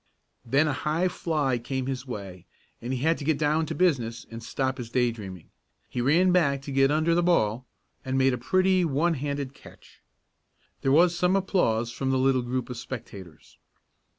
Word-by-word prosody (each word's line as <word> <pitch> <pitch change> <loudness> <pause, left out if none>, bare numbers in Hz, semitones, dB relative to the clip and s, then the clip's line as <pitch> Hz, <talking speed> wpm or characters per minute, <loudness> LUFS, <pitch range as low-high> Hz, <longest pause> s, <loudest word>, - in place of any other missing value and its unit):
Then 140 +6 +2
a 150 - 0
high 155 +6 0
fly 145 -8 -1
came 130 +2 -3
his 130 0 -4
way 95 -7 -8 0.3
and 120 +2 -4
he 130 -2 -2
had 165 +3 +2
to - - -6
get 155 0 +1
down 155 +1 +1
to 160 - -4
business 125 -11 0
and 115 0 -7
stop 130 +3 -2
his 120 -2 -6
day 125 0 +2
dreaming. 95 -7 -10 0.4
He 125 - -3
ran 170 +9 +4
back 140 -7 +2
to 140 - -6
get 135 0 +3
under 155 +3 +2
the 175 - +3
ball, 130 -9 +1 0.4
and 130 0 -2
made 135 0 +3
a - - -1
pretty 185 +6 +2
one 165 +2 +1
handed 140 -2 -3
catch. - - -17 0.8
There 135 - +1
was 170 +4 +5
some 180 +2 +2
applause 120 - +1
from 130 +3 -3
the 130 - +2
little 130 0 +2
group 125 +1 -3
of 125 - -6
spectators. 100 - -9
135 Hz, 190 wpm, -26 LUFS, 120-160 Hz, 0.8 s, was